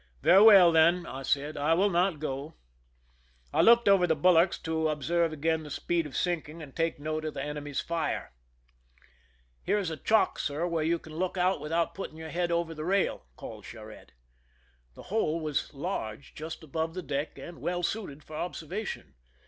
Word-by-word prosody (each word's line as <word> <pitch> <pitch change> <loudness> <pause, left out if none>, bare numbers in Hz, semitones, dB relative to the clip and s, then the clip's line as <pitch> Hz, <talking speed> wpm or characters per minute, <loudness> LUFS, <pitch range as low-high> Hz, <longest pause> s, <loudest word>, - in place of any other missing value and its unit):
"Very 195 - +7
well, 200 -5 +9
then," 170 +2 +4
I 135 - -7
said; 145 +3 -1
"I 155 +3 +2
will 200 +3 +2
not 175 -1 +2
go." 145 +1 -5 1.0
I - - +4
looked 235 0 +6
over 195 -3 +5
the 160 - +2
bulwarks 175 +3 +4
to 160 -1 0
observe 165 +3 0
again 160 +1 0
the 150 - -9
speed 165 +2 -1
of 140 - -6
sinking 170 -3 -2
and 140 -3 -12
take 165 0 0
note 155 +1 -3
of 155 -1 -4
the 135 - -3
enemy's 145 -1 -4
fire. 165 -3 -3 0.7
" - - -33
Here - - +1
is 190 -5 -2
a 160 - -5
chock, 220 +9 +2
sir, 145 +4 -1
where 165 -2 -1
you 170 +2 +1
can 160 -1 -13
look 185 +2 -2
out 180 -3 +1
without 165 +2 -1
putting 175 -5 -7
your 160 -1 -8
head 175 0 -1
over 170 -1 0
the 155 -1 -6
rail," 195 +3 0
called - - -9
Oharette. - - -11 0.9
The - - -11
hole 165 -7 +1
was 155 -3 -2
large, 140 - -5
just 160 +1 -7
above 160 +2 -3
the 185 - -4
deck, 145 0 -3
and 170 -1 -10
well 175 0 -2
suited 170 -7 -3
for 155 - -10
observation. 175 - -5
160 Hz, 190 wpm, -29 LUFS, 150-175 Hz, 1.0 s, well